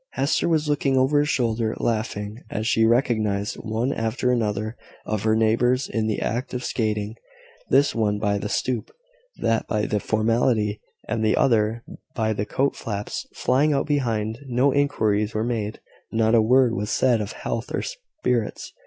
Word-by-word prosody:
Hester 140 +4 +1
was 155 -2 +1
looking 140 -2 +1
over 135 +3 +3
his 145 +1 +1
shoulder, 115 -4 0
laughing, 110 -1 -2
as 110 - -3
she 110 0 +3
recognised 110 -4 +1
one 115 +5 -1
after 115 +3 0
another 110 -2 -1 0.3
of 110 -2 -2
her 110 +1 +2
neighbours 120 +4 +2
in 110 -1 -1
the 110 - -1
act 125 +2 -2
of 125 - -3
skating 105 -2 -2 0.5
this 145 - +4
one 105 -3 +1
by 105 -1 0
the 105 - -4
stoop 120 -1 -1 0.5
that 115 -1 0
by 105 -1 0
the 105 - 0
formality 110 -1 +1 0.3
and 110 0 -1
the 110 - +3
other 115 -2 +2 0.3
by 110 -1 +1
the 105 0 -3
coat 140 +1 0
flaps 105 -3 -4
flying 145 +4 +2
out 140 - +1
behind. 115 -6 -1
No 130 +2 +2
inquiries 110 -7 +1
were 110 - +1
made 115 -3 -2 0.3
not 110 0 +2
a 115 - +6
word 125 +1 +4
was 105 -1 -2
said 120 -4 +2
of 105 - -4
health 115 +2 -4
or - - -1
spirits. - - -3
115 Hz, 170 wpm, -24 LUFS, 110-125 Hz, 0.5 s, a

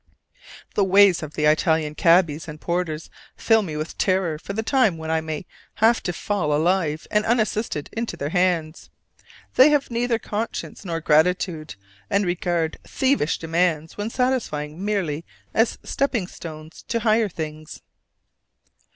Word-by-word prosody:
The 205 - +2
ways 195 -1 +5
of 155 -1 -7
the 150 - 0
Italian 155 0 +2
cabbies 165 -2 +3
and 155 -1 -8
porters 170 -3 -3 0.3
fill 225 -1 +4
me 160 -7 -5
with 155 +2 -5
terror 185 -5 +1
for 200 - -6
the 220 +2 -2
time 225 - +2
when 160 0 -4
I 160 0 +1
may 160 +1 -5 0.3
have 225 +2 +3
to 180 - -2
fall 175 -4 -1
alive 160 -1 +1
and 210 0 +3
unassisted 215 -8 0
into 230 0 -3
their 145 - -3
hands: 170 -3 0 0.6
they 260 +4 +7
have 290 -4 +1
neither 235 0 +1
conscience 220 -1 -5
nor 165 -3 -3
gratitude, 160 - +1 0.3
and 200 0 +2
regard 175 -2 -1
thievish 265 - +1
demands 165 -1 0
when 205 +2 -3
satisfied 235 - -1
merely 175 -3 -2 0.3
as 225 +1 +2
stepping 255 -8 0
stones 160 -2 -10
to 230 -1 -1
higher 220 -1 +3
things. 155 -2 -7
175 Hz, 145 wpm, -23 LUFS, 155-215 Hz, 0.6 s, they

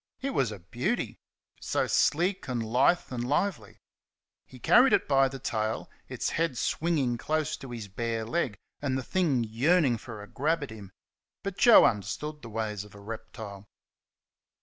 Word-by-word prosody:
It 275 +1 -2
was 130 - +1
a 105 - -6
beauty. 120 - -3 0.4
So - - 0
sleek 180 +5 +1
and 120 -3 -1
lithe 130 +10 +2
and 120 -1 -3
lively! 145 - -1 0.7
He 130 - -13
carried 245 - +5
it - - +3
by 135 -1 +4
the 135 0 -6
tail, 110 -3 -2 0.2
its - - -2
head 165 -6 0
swinging 140 -8 0
close 155 +2 -1
to 135 - -10
his 115 -4 -6
bare 115 +3 -3
leg, 125 -4 -1 0.2
and 135 -2 0
the 130 - -3
thing 150 -7 +1
yearning 125 +3 +2
for 110 -3 -9
a - - -11
grab 155 +6 0
at 140 - -7
him. 100 -4 -10 0.5
But 195 -1 -5
Joe 235 - +8
understood 150 +8 -2
the 115 - -9
ways 105 -2 -3
of 105 -1 -15
a - - -11
reptile. 105 -2 -8
125 Hz, 170 wpm, -28 LUFS, 110-155 Hz, 0.7 s, Joe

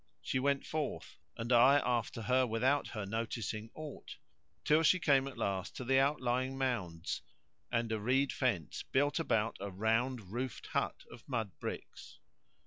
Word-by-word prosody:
She 130 - 0
went 140 +1 +1
forth 155 -2 -4 0.2
(and 115 +2 0
I 130 +4 +7
after 120 -2 -1
her 130 +3 +3
without 125 +6 +2
her 105 -3 -5
noticing 110 0 -3
aught) 155 -3 -8 0.5
till 155 +2 +5
she 165 +3 +5
came 140 -6 +3
at 135 - -8
last 95 -1 -2
to - - -5
the 135 +2 +4
outlying 130 -2 +1
mounds[FN#120] 105 -12 -2 0.5
and 115 -1 0
a 110 - 0
reed 130 +6 +2
fence 115 - -1
built 145 +4 +1
about 115 -8 +1
a 100 +1 -4
round 110 +2 0
roofed 125 +1 -4
hut - - -2
of 120 - -12
mud 115 -6 -1
bricks. - - -7
125 Hz, 155 wpm, -34 LUFS, 110-135 Hz, 0.5 s, I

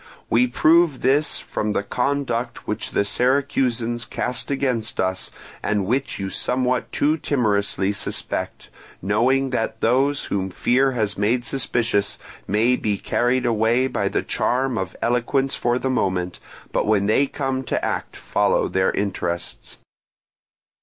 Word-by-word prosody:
We 125 +2 +4
prove 155 +3 +3
this 145 +3 +2
from 105 -1 -3
the 100 - 0
conduct 125 0 -2
which 105 - -3
the 100 - +1
Syracusans 125 0 0
cast 125 -1 -3
against 130 -5 -1
us 95 0 -1 0.3
and 105 -2 0
which 130 +7 -1
you 95 -1 -4
somewhat 125 0 0
too 155 +2 +2
timorously 100 -8 +1
suspect; 100 - -4 0.3
knowing 125 +7 +1
that 115 -3 -2
those 135 +4 +2
whom 95 -1 -2
fear 130 +8 +2
has 105 -4 -1
made 120 +4 +1
suspicious 115 -6 0 0.3
may 110 +5 +3
be 105 -2 -1
carried 125 +5 0
away 115 +2 +2
by 130 - -1
the - - -1
charm 130 0 0
of 95 -4 -3
eloquence 125 +3 +1
for 120 0 +1
the 130 +1 -1
moment, 90 -7 -1 0.3
but - - 0
when 105 -2 +3
they 125 +7 +3
come 135 -1 -2
to - - -1
act - - -3
follow - - +1
their 95 0 +1
interests. 90 -3 -3
120 Hz, 140 wpm, -22 LUFS, 105-130 Hz, 0.3 s, We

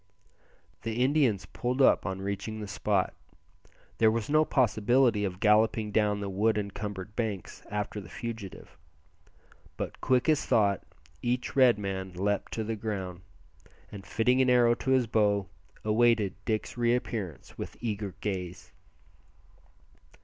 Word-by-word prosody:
The 115 +2 -1
Indians 130 -8 +2
pulled 125 +2 -3
up 130 - +4
on 95 0 -4
reaching 100 +2 -4
the 105 - -5
spot. 100 -1 0 0.9
There 110 - +6
was 115 +4 -2
no 155 +1 +5
possibility 120 -3 +3
of 90 -2 -3
galloping 105 0 +3
down 105 -1 +1
the 100 - -3
wood 105 +3 +1
encumbered 100 0 -5
banks 110 -6 -4
after 105 0 -3
the 90 - -12
fugitive; 110 -4 -7 1.0
but - - -5
quick 125 -1 +2
as 155 -2 +3
thought 100 -3 +2 0.4
each 125 +1 -2
Red 130 -4 +6
man 95 -2 -4
leaped 100 +3 -1
to 110 - -2
the 110 +1 -3
ground, 95 -5 -4 0.7
and 100 -2 -8
fitting 125 +5 +2
an 130 - +3
arrow 120 -1 +5
to 125 - -4
his 130 -2 +4
bow, 105 -3 +2 0.4
awaited 110 -2 +3
Dick's 110 -1 -2
re 120 0 +3
appearance 105 -9 -5
with - - -6
eager 105 -4 -3
gaze. 90 -4 -4
105 Hz, 140 wpm, -29 LUFS, 100-120 Hz, 1.0 s, There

